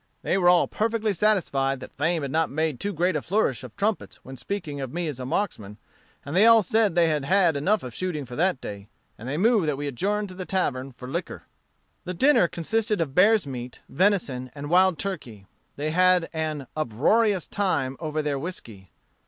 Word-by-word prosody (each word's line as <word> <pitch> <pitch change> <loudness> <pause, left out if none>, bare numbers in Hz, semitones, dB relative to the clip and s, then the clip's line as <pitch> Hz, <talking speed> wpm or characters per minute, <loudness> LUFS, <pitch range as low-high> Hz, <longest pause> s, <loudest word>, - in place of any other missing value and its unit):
They - - +1
were 180 -2 +4
all 180 -1 +4
perfectly 220 -1 -1
satisfied 160 -9 +1
that 130 - -11
fame 160 +2 0
had 140 - -4
not 160 +1 +1
made 155 -2 -1
too 205 - -2
great 180 0 0
a 150 - 0
flourish 165 - 0
of 125 -3 -10
trumpets 210 +1 -1
when 130 - -9
speaking 150 -1 -5
of 130 -2 -5
me 175 0 -3
as 145 -4 -5
a 125 - -5
marksman: 105 - -3 0.5
and 145 +3 -5
they 205 +5 +6
all 230 -1 +7
said 215 -1 +1
they 170 -1 +4
had 160 +3 +2
enough 190 +10 +1
of 125 -2 -7
shooting 160 -2 -3
for 120 0 -9
that 180 -2 +1
day, 100 -3 -8 0.3
and 120 +4 -7
they 145 - -2
moved 215 -2 +3
that 145 -2 0
we 145 - -4
adjourn 200 - -1
to 185 - -9
the 185 0 -6
tavern 135 -9 -2
and 125 +2 -8
liquor." 170 - -4 0.6
The 180 0 -4
dinner 260 -3 +4
consisted 210 +6 -1
of 155 -5 -2
bear's 205 +2 +4
meat, 125 -2 -7
venison, 140 -8 0
and 145 +1 -6
wild 185 -1 +4
turkey. 125 - -6 0.3
They 150 +2 -2
had 180 0 +3
an 155 -3 -3
"uproarious" 175 - +1
time 145 -10 -1
over 155 -1 -2
their 145 -2 -1
whiskey. 115 - -8
165 Hz, 200 wpm, -25 LUFS, 135-195 Hz, 0.6 s, all